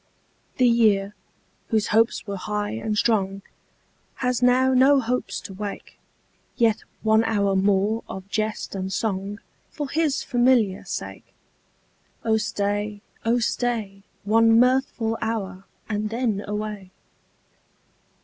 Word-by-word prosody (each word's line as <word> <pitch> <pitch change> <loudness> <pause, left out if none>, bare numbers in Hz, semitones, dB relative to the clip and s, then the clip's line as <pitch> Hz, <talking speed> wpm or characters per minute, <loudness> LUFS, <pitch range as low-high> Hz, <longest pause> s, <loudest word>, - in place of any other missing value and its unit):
The 255 - +4
year, 210 -4 +3 0.5
whose 220 -3 0
hopes 225 +2 +2
were 200 -1 -4
high 210 +1 -3
and 220 -1 -3
strong, 195 -3 +1 0.7
Has 250 -1 -1
now 255 +1 +4
no 270 +2 +5
hopes 250 0 -2
to 195 - -9
wake; 205 +1 -7 0.6
Yet 225 -3 +3 0.2
one 220 0 +4
hour 200 -3 +1
more 200 +3 +2
of 190 0 -7
jest 215 +1 -2
and 190 -1 -4
song 200 0 -2 0.3
For 295 -2 -5
his 305 0 0
familiar 240 -6 +2
sake. - - -7 0.9
Oh 220 -1 +3
stay, 205 0 -2 0.2
oh 230 +2 +3
stay, 225 -4 -2 0.2
One 225 +2 +5
mirthful 250 -3 +1
hour, 195 -4 -3 0.2
and 215 0 -2
then 225 -3 -1
away. 210 -2 -4
220 Hz, 120 wpm, -24 LUFS, 200-235 Hz, 0.9 s, no